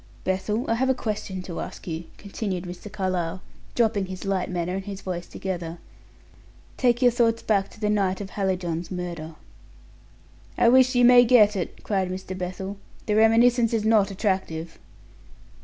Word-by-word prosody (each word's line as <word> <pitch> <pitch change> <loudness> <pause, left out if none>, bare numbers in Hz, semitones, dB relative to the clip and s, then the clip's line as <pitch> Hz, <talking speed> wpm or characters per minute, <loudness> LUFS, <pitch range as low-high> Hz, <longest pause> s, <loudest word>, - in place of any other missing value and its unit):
"Bethel, 195 +6 -1
I - - +2
have 260 +3 +1
a 265 - +3
question 205 -5 -4
to 175 -2 -6
ask - - -7
you," 165 -1 -5
continued 195 -3 -4
Mr. 180 +3 -8
Carlyle, 185 -3 -2 0.4
dropping 215 -5 +1
his 185 +1 -7
light 195 -2 -1
manner 180 -1 -2
and 190 0 -4
his 200 -1 -6
voice 175 -2 -5
together. 175 -3 -5 1.0
"Take 245 -1 +2
your 245 - +6
thoughts 230 -1 +1
back 200 -3 +1
to - - -17
the 210 - 0
night 195 -3 +1
of 195 -2 -7
Hallijohn's 180 -4 -2
murder." 170 -3 -5 1.2
"I 235 - +5
wish 255 +1 +5
you 245 0 +5
may 245 0 +8
get 220 -4 +5
it," 185 - -5
cried 190 -3 0
Mr. 185 0 -5
Bethel. 185 +2 -5 0.3
"The 210 - 0
reminiscence 230 +2 +4
is 220 -2 0
not 215 -3 +4
attractive." 185 -5 -2
195 Hz, 165 wpm, -25 LUFS, 180-225 Hz, 1.2 s, may